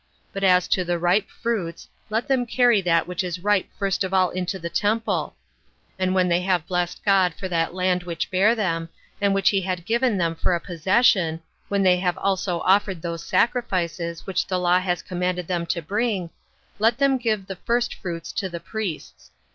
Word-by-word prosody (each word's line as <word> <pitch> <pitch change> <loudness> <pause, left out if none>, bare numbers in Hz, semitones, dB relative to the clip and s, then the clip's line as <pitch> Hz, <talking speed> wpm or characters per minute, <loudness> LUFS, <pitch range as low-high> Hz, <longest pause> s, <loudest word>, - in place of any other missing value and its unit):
But 195 - -4
as 180 -2 +4
to 185 - +2
the 175 0 -1
ripe 175 +4 +1
fruits, 205 -8 -3 0.2
let 220 +2 -1
them 255 -3 +1
carry 240 -3 +4
that 170 -2 +2
which 180 +1 -2
is 180 -1 -3
ripe 205 -2 +2
first 195 0 0
of 190 0 -2
all 185 -1 +3
into 185 +1 -3
the 170 -2 -5
temple; 210 +6 -1 0.6
and 185 0 +1
when 185 -1 +3
they 175 0 +2
have 180 -3 0
blessed 180 -1 -2
God 190 -4 +3
for 190 - -5
that 165 0 0
land 180 -1 +1
which 170 -1 -4
bare 200 +5 +4
them, 165 -6 -1 0.3
and 200 0 +3
which 195 0 +3
he 195 -2 +1
had 180 -2 -3
given 235 0 +1
them 170 -2 0
for 165 +2 0
a - - -1
possession, 180 -1 +2 0.3
when 200 -1 +1
they 180 -1 +5
have 180 -1 -1
also 190 -3 -1
offered 190 -3 +2
those 170 -1 -4
sacrifices 175 -9 -1
which 190 - -1
the 185 - 0
law 180 0 +3
has 180 -2 -2
commanded 180 -1 -2
them 175 -2 -2
to 170 -1 -2
bring, 200 -1 -1 0.5
let 225 +2 +3
them 275 -1 +2
give 215 -5 -1
the 190 -1 -7
first 240 +5 0
fruits 165 -2 -6
to 190 - -3
the 170 -1 -6
priests. 190 -1 -6
185 Hz, 195 wpm, -23 LUFS, 175-205 Hz, 0.6 s, they